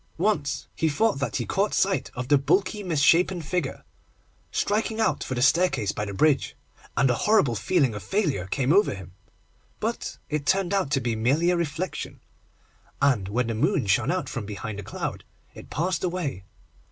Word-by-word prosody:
Once 160 -6 0
he 160 - +1
thought 180 +2 +1
that 140 - -2
he - - -1
caught 200 +2 0
sight 195 0 +1
of 125 0 -4
the 145 - +5
bulky 195 +8 +1
misshapen 175 +1 +3
figure 165 -2 -3 0.7
striking 220 +1 0
out 220 - +1
for 130 - -4
the 125 - +1
staircase 150 - +3
by 105 - -3
the 100 - -5
bridge, 140 +7 +2 0.4
and 135 -2 +4
a 125 - -1
horrible 200 - +4
feeling 135 - +1
of 105 - -6
failure 155 - -1
came 130 +7 +1
over 200 - +3
him, 95 -2 -10 0.7
but - - -3
it 150 -1 -3
turned 190 -1 +2
out 195 -8 +1
to 140 -1 +2
be 120 -3 -1
merely 140 +10 +2
a - - +2
reflection, 170 +2 -3 0.8
and 125 -9 +2
when 120 +4 0
the 115 - -2
moon 150 - +1
shone 115 +6 +2
out 185 +1 -1
from 120 - -4
behind 105 0 -5
a - - -6
cloud 100 - -5 0.3
it - - -12
passed 175 +3 -1
away. 170 - -3
145 Hz, 180 wpm, -25 LUFS, 120-185 Hz, 0.8 s, the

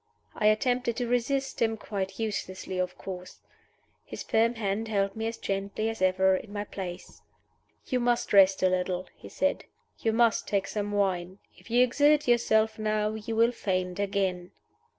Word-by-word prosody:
I 210 - +1
attempted 240 +2 +1
to 245 -1 -1
resist 265 +3 -1
him 225 -1 +2
quite 195 -2 -4
uselessly, 190 -4 -4
of 185 0 -2
course. 185 -1 -8 0.7
His - - -7
firm 230 +2 +2
hand 215 0 -2
held 200 -2 0
me 220 0 -2
as 230 - -4
gently 200 +3 -2
as 225 -3 -6
ever 190 0 +4
in 200 +2 -6
my 205 0 -3
place. 185 -3 -8 0.6
"You 255 - 0
must 240 -2 0
rest 195 -1 +6
a 185 - +5
little," 185 0 -1
he - - -12
said. 285 - -1 0.3
"You 225 - +1
must 230 0 +2
take 200 -2 0
some 205 -1 -3
wine. 190 -2 -1 0.2
If - - -18
you 240 +2 +5
exert 290 +4 +3
yourself 220 -2 +3
now 215 0 0
you 220 +1 -5
will 230 +2 +4
faint 185 -5 -2
again." 190 -3 -1
210 Hz, 170 wpm, -28 LUFS, 190-230 Hz, 0.7 s, rest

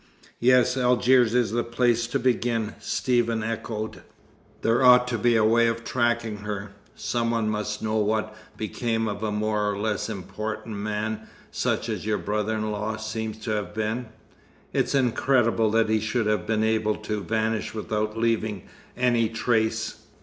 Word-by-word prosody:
"Yes, 125 +1 +4
Algiers 125 -1 +4
is 120 -4 +2
the 120 +1 0
place 120 -1 +1
to - - 0
begin," 115 -3 0
Stephen 115 -3 0
echoed. 110 -1 -4 0.6
"There 115 +3 +3
ought 125 0 +7
to 120 -2 -1
be 120 +2 +3
a 110 - +4
way 115 +1 +4
of 115 0 -2
tracking 120 -3 0
her. 105 -1 -5 0.2
Some 115 -1 -1
one 115 -2 0
must 105 0 -3
know 110 0 0
what 110 0 0 0.2
became 115 +1 -1
of 100 -1 -4
a 110 -1 -1
more 105 0 0
or 100 - -2
less 105 0 -1
important 105 +2 -5
man 105 +1 -3 0.2
such - - -1
as - - -3
your 105 +1 0
brother 105 +1 -1
in 110 0 -2
law 105 +1 -3
seems 110 0 -4
to 110 - -2
have 105 -3 -3
been. 110 +3 -2 0.7
It's - - +1
incredible 120 -3 +2
that 115 +1 +3
he 110 0 +3
should 110 +2 -1
have 105 -4 0
been 110 -1 +1
able 110 -1 +1
to 105 -1 -4
vanish 110 +3 -1
without 110 0 -2
leaving 110 -4 0 0.3
any 120 -2 +2
trace." 110 -1 0
110 Hz, 165 wpm, -25 LUFS, 105-115 Hz, 0.7 s, ought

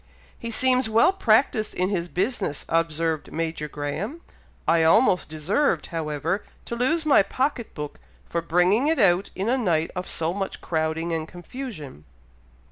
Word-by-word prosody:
"He 230 - -6
seems 255 0 +3
well 230 - +4
practised 220 - +2
in 185 +1 +1
his 175 -4 -1
business," 190 - -2
observed 165 -1 0
Major 160 -2 -3
Graham. 150 - -4 0.5
"I 165 0 +4
almost 180 +3 +4
deserved; 165 - 0
however, 160 +4 -2 0.2
to 235 - -4
lose 310 +7 +1
my 295 - +6
pocket 255 +2 -2
book 150 -1 -6 0.3
for 170 - -2
bringing 180 - +3
it 320 0 +2
out 195 -4 +3
in 195 +3 -2
a 260 +3 +2
night 165 -8 +1
of 180 0 -4
so 165 +1 -1
much 195 0 -4
crowding 160 +1 -1
and 160 -1 -2
confusion. 175 - -8
180 Hz, 150 wpm, -24 LUFS, 160-235 Hz, 0.5 s, my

